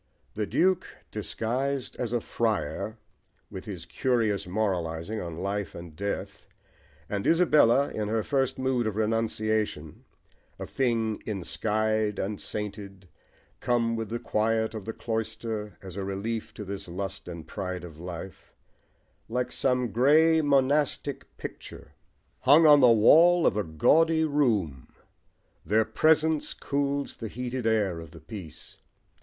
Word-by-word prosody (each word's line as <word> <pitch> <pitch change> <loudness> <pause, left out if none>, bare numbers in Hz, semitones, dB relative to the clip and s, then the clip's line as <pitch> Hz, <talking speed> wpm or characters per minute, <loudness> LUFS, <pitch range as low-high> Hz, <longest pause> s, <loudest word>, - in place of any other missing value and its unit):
The 105 -1 -2
Duke 185 +1 +2 0.2
disguised 125 +5 -2
as 120 -3 -3
a 120 - +1
friar, 110 -1 -2 0.5
with 95 - -7
his 95 -6 -7
curious 110 -2 0
moralising 90 -1 -2
on 85 -2 -6
life 100 -1 -3
and 85 -2 -9
death, 100 +4 -5 0.6
and 100 -1 -2
Isabella 150 -6 +4
in 105 -1 -3
her 110 0 0
first 135 -2 0
mood 130 -3 0
of 105 - -2
renunciation, 110 -6 -1 0.5
a - - -5
thing 115 -5 0
"ensky'd 110 +2 -1
and 100 +1 -3
sainted," 100 -3 -6 0.5
come 115 -1 +1
with 115 -1 -4
the 115 - -2
quiet 110 0 0
of 110 -3 -6
the 115 - -4
cloister 110 -3 -4
as 95 -2 -9
a 100 - -2
relief 100 +4 -3
to 105 - -7
this 100 0 -6
lust 95 +2 -5
and 85 -2 -7
pride 90 -3 -5
of 80 -3 -10
life: 90 +1 -9 0.7
like 125 +2 -1
some 125 -3 0
grey 155 - +5
monastic 140 0 0
picture - - -9 0.5
hung 145 +5 +6
on 150 -1 +8
the 125 -3 +7
wall 165 +10 +6
of - - +3
a 105 - 0
gaudy 160 - +3
room, 110 - 0 0.8
their 110 +2 +2
presence 160 +1 +2
cools 140 0 -2
the 115 - -5
heated 125 +1 -4
air 105 -6 +1
of 80 -1 -9
the 80 +1 -13
piece. 80 0 -10
110 Hz, 135 wpm, -27 LUFS, 100-130 Hz, 0.8 s, on